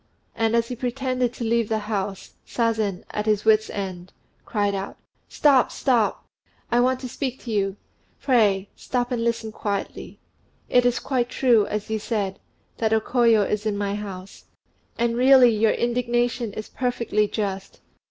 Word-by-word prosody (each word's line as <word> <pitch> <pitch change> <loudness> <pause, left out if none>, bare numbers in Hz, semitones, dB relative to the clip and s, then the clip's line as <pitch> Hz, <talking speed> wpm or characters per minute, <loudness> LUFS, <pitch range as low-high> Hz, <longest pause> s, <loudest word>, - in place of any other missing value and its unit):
And 225 0 +1
as 230 0 +1
he 250 - -3
pretended 250 0 -1
to 240 - -6
leave 230 -1 +1
the 220 - +1
house, 200 -2 -4
Sazen, 220 -5 -1
at 210 +1 -3
his 210 -1 +1
wits' 220 0 +4
end, 185 -2 -6 0.3
cried 205 -3 0
out, 195 0 -5 0.3
"Stop! 275 -4 +3
stop! 240 -6 +1 0.5
I 240 - +3
want 255 +1 +2
to 255 - -5
speak 260 +1 -4
to 235 - -6
you. 195 -2 0 0.4
Pray, 205 -7 +2
stop 245 0 -2
and 235 -2 -1
listen 230 -1 -1
quietly. 205 -2 -5 0.5
It 245 0 +4
is 245 - +1
quite 250 -3 -1
true, 235 -6 +3
as 210 +1 -4
you 220 - 0
said, 205 -3 -3 0.4
that 220 -1 +1
O 220 - +4
Koyo 230 -2 +3
is 210 +2 -2
in 205 -1 -1
my 200 -1 -1
house; 195 -2 -8 0.5
and 235 0 +1
really 255 0 +6
your 215 +1 +3
indignation 240 -1 0
is 215 - -6
perfectly 235 -4 -1
just. 195 -2 -4
225 Hz, 160 wpm, -24 LUFS, 205-245 Hz, 0.5 s, really